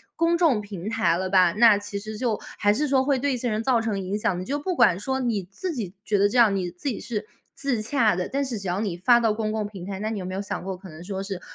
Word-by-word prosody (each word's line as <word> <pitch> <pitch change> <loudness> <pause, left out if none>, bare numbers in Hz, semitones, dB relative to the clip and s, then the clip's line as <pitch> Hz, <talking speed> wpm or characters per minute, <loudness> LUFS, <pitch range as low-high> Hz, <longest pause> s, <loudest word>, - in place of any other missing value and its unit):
公 335 +1 +2
众 320 -11 +3
平 200 -1 -6
台 220 -7 +2
了 185 +2 -2
吧， 185 -2 +5
那 225 -1 +6
其 205 0 -5
实 215 +1 -7
就 230 -2 -1 0.2
还 205 0 +3
是 295 +7 0
说 265 -1 +3
会 275 -1 +1
对 280 +1 0
一 - - -1
些 245 -1 -2
人 215 +1 0
造 240 -2 +3
成 220 -3 -1
影 195 +2 -2
响 210 -1 0
的。 - - -4
你 185 - -5
就 280 +6 -1
不 360 +5 -2
管 210 - +4
说 265 +5 -2
你 230 -6 -1
自 360 - -4
己 200 -8 -4
觉 210 - +1
得 200 +1 +4
这 245 +5 +1
样 215 -4 +5
你 180 -2 -2
自 180 +11 -4
己 235 - -3
是 215 -3 -4 0.3
自 275 -5 -1
洽 225 -4 +2
的， 180 0 -2
但 280 +2 -1
是 255 -4 -3
只 195 -2 -6
要 180 +2 -1
你 195 -6 -2
发 235 +7 +5
到 225 -2 +2
公 215 0 -2
共 215 -1 -2
平 195 -4 -9
台， 195 0 -5
那 215 +2 -2
你 220 - -3
有 185 - -5
没 185 - -5
有 195 - -2
想 195 - -5
过， 190 0 -4
可 190 +1 -12
能 160 +1 -11
说 190 +1 -4
是 195 -2 -5
215 Hz, 335 characters per minute, -25 LUFS, 195-245 Hz, 0.3 s, 那